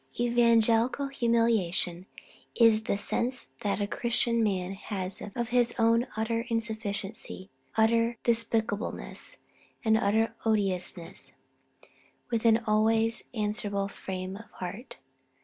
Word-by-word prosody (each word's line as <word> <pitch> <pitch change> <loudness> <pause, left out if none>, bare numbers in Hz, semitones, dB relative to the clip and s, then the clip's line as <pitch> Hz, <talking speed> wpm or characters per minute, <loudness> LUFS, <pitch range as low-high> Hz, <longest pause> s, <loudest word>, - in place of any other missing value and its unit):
"Evangelical 235 +2 +3
humiliation 225 -8 +1 0.5
is 225 -2 +5
the 200 - 0
sense 240 +5 -1
that 205 -2 -1
a 205 - +1
Christian 235 +2 +1
man 190 -3 -1
has 195 -1 -5
of 235 -1 -2
his 240 0 +3
own 230 +1 +3
utter 230 +2 -1
insufficiency, 220 -4 -4 0.3
utter 230 +1 +3
despicableness, 230 - -1 0.5
and 220 0 +5
utter 220 +2 +2
odiousness; 190 -5 -2 1.0
with 230 -1 0
an 225 0 +5
always 225 +1 +2
answerable 210 -2 -1
frame 185 -1 -6
of 225 - -13
heart. 195 +8 -7
225 Hz, 105 wpm, -29 LUFS, 200-235 Hz, 1.0 s, is